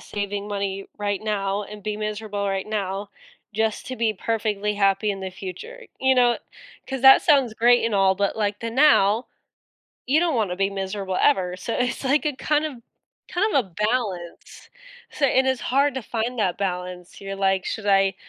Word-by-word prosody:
saving 205 0 -4
money 195 -1 -3
right 205 -1 -2
now 205 -1 -1
and 210 0 -10
be 210 0 -3
miserable 210 -1 -3
right 195 -1 -2
now 200 -1 -3 0.4
just 220 +1 -1
to 255 - -5
be 225 -2 +1
perfectly 210 -1 -1
happy 200 +1 +2
in 195 - -7
the 190 - -5
future?" 310 - -9 0.2
You 265 0 +4
know? 245 -1 +4 0.5
'Cause 265 -2 -4
that 265 0 +9
sounds 275 -8 +3
great 240 +1 +4
and 230 - 0
all, 195 -1 +4
but 200 +1 0
like 205 -1 -1
the 230 0 -3
now, 235 -5 +4 0.8
you 295 +5 +3
don't 335 -6 +1
want 215 -5 0
to 180 - -3
be 195 +1 +1
miserable 195 -1 -3
ever, 180 -10 +2
so 225 +5 -4
it's 250 0 -1
like 285 +4 +2
a 295 -3 -1
kind 300 +2 +1
of 270 -6 -6 0.5
kind 410 +4 0
of 260 - +3
a - - -19 0.2
balance. 195 -8 -4 0.4
So 280 - +1
and 260 0 +3
it's 260 -2 0
hard 280 +2 +2
to 265 - -4
find 235 +2 -3
that 190 -5 +1
balance. 180 -2 -5
You're 195 0 -6
like, 195 -1 +1
"Should 220 - -4
I, 195 -1 +3
210 Hz, 190 wpm, -23 LUFS, 195-250 Hz, 0.8 s, that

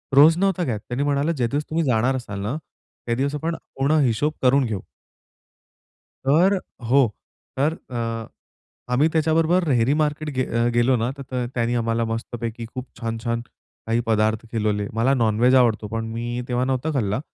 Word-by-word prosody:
रोज 160 +4 +7
नव्हता 190 -2 +1
घेत, 115 -9 -1
त्यांनी 125 +6 -3
म्हणालं, 145 +3 +1
ज्या 130 -7 0
दिवस 145 +5 -1
तुम्ही 160 +1 0
जाणार 125 +1 +2
असाल 105 -6 -5
ना, 105 +8 -2 0.5
त्या 120 0 0
दिवस 140 +3 -1
आपण 165 +3 -2 0.2
पूर्ण 145 +3 +2
हिशोब 125 +6 +1
करून 130 +1 +4
घेऊ. 105 -5 -3 1.4
तर 170 +8 +5
अ, - - -1 0.3
हो. 130 +2 +4 0.5
तर 145 +4 +2 0.2
अ, 115 -2 -3 0.7
आम्ही 145 +5 +4
त्याच्याबरोबर 160 +3 +3
रेहरी 125 0 +3
मार्केट 150 +1 -1
गे 130 - +2
अ, 115 +1 0
गेलो 120 +2 +3
ना, 115 +2 0
त - - -7
तर 125 -1 -1
त्याने 120 0 0
आम्हाला 115 0 0
मस्तपैकी 115 0 -5
खूप 130 0 -5
छान-छान 115 0 -2 0.5
काही 115 +1 +2
पदार्थ 110 0 +1
खिलवले. 105 -2 0
मला 115 +4 +2
नॉन-व्हेज 120 +1 +3
आवडतो, 115 -4 +3
पण 115 +1 -3
मी 120 +1 -3
तेव्हा 125 +1 0
नव्हता 135 +4 -1
खाल्ला. 105 -3 0
125 Hz, 170 wpm, -23 LUFS, 115-145 Hz, 1.4 s, रोज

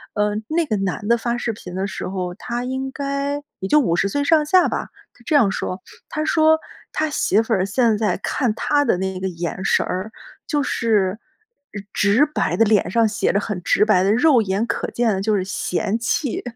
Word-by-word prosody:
呃， 210 0 +1 0.2
那 330 +1 +1
个 220 - -1
男 195 +2 -3
的 235 0 +4
发 235 +1 -2
视 230 -1 -2
频 180 -3 -9
的 190 +1 -1
时 - - -5
候， 180 -2 -4
他 240 +5 -5
应 265 +1 -3
该 280 +1 -3 0.2
也 190 - -3
就 300 - +5
50 195 - +1
岁 285 +7 -1
上 305 0 +3
下 365 +4 +4
吧， - - -3 0.2
他 240 - -22
这 305 - +1
样 230 -9 +5
说， 185 0 -4 0.3
他 310 0 -2
说， 315 0 +4 0.3
他 310 0 -1
媳 220 -6 +2
妇 225 0 -2
儿 190 -2 +1
现 225 +1 +2
在 210 -5 0
看 245 -6 0
他 290 +4 +1
的 180 - +1
那 190 0 -3
个 190 - -2
眼 175 +2 -5
神 - - +2
儿， 190 +4 -4 0.4
就 295 -3 0
是 215 -5 0 0.7
直 210 +8 +3
白 300 - -1
的 225 - +5
脸 210 -4 +2
上 230 +3 +3
写 210 - 0
着 200 - +2
很 200 -4 -4
直 - - +3
白 210 -4 +4
的 200 - +2
肉 250 0 +4
眼 200 +3 -1
可 - - -3
见 235 -3 +1
的， 190 - -2
就 215 +1 +1
是， 190 - 0
嫌 195 +2 -2
弃。 250 +2 -1
220 Hz, 225 characters per minute, -21 LUFS, 195-280 Hz, 0.7 s, 就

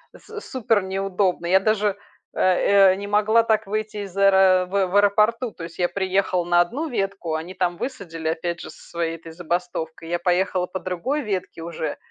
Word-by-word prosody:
с 435 -1 -10
супер 230 - 0
неудобно. 190 -1 -1
Я 190 +2 +5
даже, 210 -1 +1 0.4
э, - - -5 0.5
э, - - +1
не 200 +1 -6
могла 215 +2 +3
так 220 -1 +1
выйти 215 +1 -3
из 190 -2 -12
аэро 190 -2 +5
в 195 0 +1
в 180 - -5
аэропорту. 215 +4 +3
То 165 - -10
есть 165 +1 -9
я 175 - +3
приехала 190 -2 0
на 175 0 +3
одну 275 - -2
ветку, 195 - -2
они 165 +4 -5
там 180 -2 -1
высадили 175 -11 -5
опять 170 +1 -3
же - - -8
со - - -16
своей 170 -1 -2
этой 165 0 -12
забастовкой. 170 -1 -4
Я 175 0 0
поехала 180 +1 +1
по 190 - -5
другой 185 - -2
ветке 190 - -4
уже, 165 -1 -4
190 Hz, 190 wpm, -23 LUFS, 175-210 Hz, 0.5 s, Я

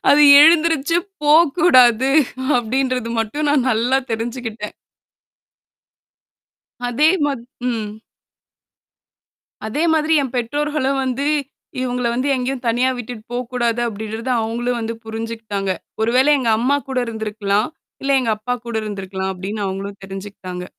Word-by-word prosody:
அது 295 +1 +6 0.2
எழுந்துருச்சு 325 0 +4 0.3
போ 295 0 +4 0.3
கூடாது 255 -6 +5 0.5
அப்பிடின்றது 250 0 -1
மட்டும் 290 +8 -2
நான் 275 -3 +2
நல்லா 245 +3 +2 0.2
தெரிஞ்சுக்கிட்டேன். 225 -2 -5 2.1
அதே 265 +6 +2 0.2
மா 290 - +1 0.4
ம். 225 -3 -2 1.8
அதேமாதிரி 315 +5 +1
என் 260 -3 -5
பெற்றோர்களும் 275 +2 -1
வந்து 260 +2 -2 0.6
இவுங்கள 250 -1 -1
வந்து 255 +4 -1
எங்கேயும் 255 0 -3
தனியா 245 +3 +2
விட்டுட்டு 240 -2 -7
போ - - -2 0.2
கூடாது 240 -1 0
அப்பிடின்றத 220 +2 -5
அவுங்களும் 240 +2 -2
வந்து 225 0 -3
புரிஞ்சுக்கிட்டாங்க. 225 -3 -4 0.3
ஒரு 220 +1 +2
வேளை 270 +3 +5
எங்க 245 -4 0
அம்மாகூட 270 +2 0
இருந்திருக்கலாம், 215 -1 -1 0.3
இல்ல 275 0 +1
எங்க 235 -3 -1
அப்பா 245 +4 -3
கூட 235 - -5
இருந்திருக்கலாம், 190 -2 -4
அப்பிடின்னு 200 +3 -5
அவுங்களும் 195 +1 -5
தெரிஞ்சுக்கிட்டாங்க. 190 -2 -7
240 Hz, 115 wpm, -19 LUFS, 220-270 Hz, 2.1 s, அது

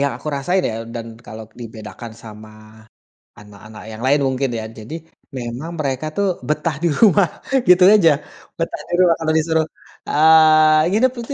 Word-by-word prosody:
yang 140 0 0
aku - - -8
rasain 175 +7 -1
ya - - -6 0.2
dan 115 -1 -6 0.2
kalau 110 +1 -9 0.2
dibedakan 115 0 -10
sama 110 -1 -12 0.9
anak-anak 105 +1 -14
yang 110 +1 -9
lain 145 +2 +3
mungkin 130 +1 -1
ya, 110 - -6
jadi 110 +7 -10 0.4
memang 125 +6 -6
mereka 135 0 -2
tuh 200 - +1 0.2
betah 150 +1 -1
di - - +3
rumah, 200 -4 +5 0.4
gitu 180 0 +6
aja. 180 -7 +5 0.5
Betah 165 - -3
di - - -6
rumah, 175 -2 +4
kalau 160 -1 -1
disuruh, 160 0 +1 0.4
eee, 155 0 +5
nginep, 240 +6 +2
itu, 235 +4 -6
155 Hz, 160 wpm, -19 LUFS, 115-165 Hz, 0.9 s, gitu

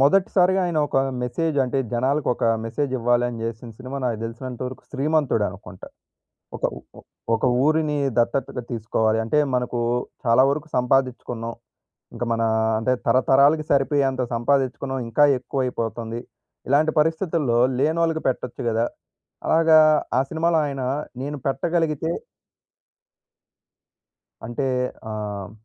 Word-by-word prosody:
మొదటిసారిగా 190 +4 +4
ఆయన 170 -3 -1
ఒక - - -2 0.3
మెసేజు 150 +4 -1
అంటే, 130 +2 -1
జనాలకు 135 +4 0
ఒక - - -3 0.2
మెసేజివ్వాలని 120 -2 0
చేసిన 115 +1 -5
సినిమా 130 +2 -6
నాకు 115 -3 -1
తెలిసినంతవరకు 125 +2 -6
'శ్రీమంతుడు' 145 -5 +1
అనుకుంట. 90 -1 -12 0.7
ఒక - - -10
ఉ - - -8 0.2
ఒ - - -13 0.3
ఒక 115 - -1 0.2
ఊరిని 155 -1 +2 0.2
దత్తతగా 125 +1 0
తీసుకోవాలి. 110 -1 0
అంటే, 150 +7 +2 0.2
మనకు 125 -1 -1 0.5
చాలా 115 +2 +5
వరకు 150 +3 -4
సంపాదిచుకున్నాం. 125 -2 0 0.6
ఇంక 120 +1 -3
మనా 115 0 +1 0.3
అంటే, 120 +3 +1 0.2
తరతరాలకి 140 +4 +4
సరిపోయేంత 135 -2 +2
సంపాదిచ్చుకున్నాం 135 +1 0
ఇంకా 145 +5 +4
ఎక్కువైపోతుంది. 120 -2 -3 0.5
ఇలాంటి 150 +3 +3
పరిస్థితుల్లో 160 -6 +1 0.2
లేనోళ్ళకి 160 +3 +1
పెట్టొచ్చు 125 -1 -3
కదా! 115 +1 +1 0.6
అలాగా 160 -1 +5 0.4
ఆ - - +4
సినిమాలో 165 0 +1
ఆయన 135 -2 -4 0.4
నేను 145 +2 -4
పెట్టగలిగితే 160 +1 0 2.4
అంటే 120 +4 -4 0.5
ఆహ్ 105 -3 -5
130 Hz, 110 wpm, -23 LUFS, 120-150 Hz, 2.4 s, చాలా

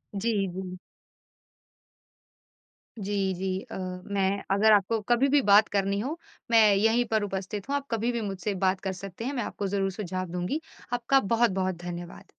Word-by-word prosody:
जी, 220 +4 0 0.2
जी। 185 0 -6 2.2
जी, 195 -2 -1
जी। 185 +1 -2
अ, - - -5 0.3
मैं 200 0 0
अगर 210 +3 +5
आपको 210 +2 +3
कभी 240 +3 +4
भी 290 +1 +4
बात 205 +1 +7
करनी 200 0 0
हो 275 +10 -3 0.3
मैं 230 -1 +7
यहीं 225 +4 +3
पर 220 -1 +2
उपस्थित 195 +2 -4
हूँ 285 - +1
आप 280 0 -3
कभी 230 +1 0
भी 235 -1 -2
मुझसे 200 -1 -3
बात 185 0 +2
कर 190 -1 -2
सकते 195 +4 -7
हैं, 275 - -2
मैं 245 - -1
आपको 200 - -4
ज़रूर 195 0 0
सुझाव 185 -2 -4
दूँगी। 180 - -2 0.3
आपका 245 +3 +3
बहुत-बहुत 195 -5 +1
धन्यवाद। 175 0 -7
200 Hz, 165 wpm, -27 LUFS, 190-230 Hz, 2.2 s, बात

